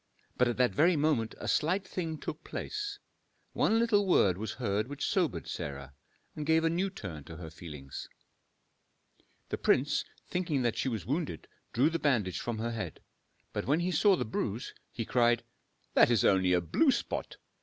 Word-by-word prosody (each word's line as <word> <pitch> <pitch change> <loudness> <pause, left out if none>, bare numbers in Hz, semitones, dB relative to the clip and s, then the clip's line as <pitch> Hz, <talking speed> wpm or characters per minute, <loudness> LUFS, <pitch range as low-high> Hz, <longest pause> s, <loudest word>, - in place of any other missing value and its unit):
But 125 - +3
at 120 - -1
that 125 -1 +3
very 170 +4 +4
moment 145 -7 +1
a - - -6
slight 185 +5 +1
thing 165 -4 -3
took - - -6
place, 415 -1 -4 0.6
one 225 - +3
little 220 -4 +3
word 100 - +4
was 105 +2 -4
heard 105 -3 -1
which 145 +1 -4
sobered 180 -5 0
Sarah, 70 -4 -5 0.4
and 150 - -4
gave 160 +2 +3
a 165 - +3
new 185 +4 0
turn 90 - -7
to 80 - -9
her 80 -2 -8
feelings. 75 -5 -8 1.4
The - - -3
prince, - - +2 0.2
thinking 165 -7 0
that 120 -2 +1
she 135 - 0
was 115 -4 -3
wounded, 145 - -2 0.2
drew 135 +7 +3
the 165 - -1
bandage 115 -11 +1
from 120 -2 -3
her 115 +2 -2
head; 100 -9 -5 0.5
but - - -3
when 150 +5 +3
he 180 +1 0
saw 195 +4 +5
the - - -2
bruise, 110 +1 -3 0.2
he 115 - -4
cried, 120 0 +3 0.5
"That - - +6
is 120 -2 +3
only 95 -2 +4
a 90 - +3
blue 280 - +2
spot! - - -1
125 Hz, 180 wpm, -31 LUFS, 100-165 Hz, 1.4 s, That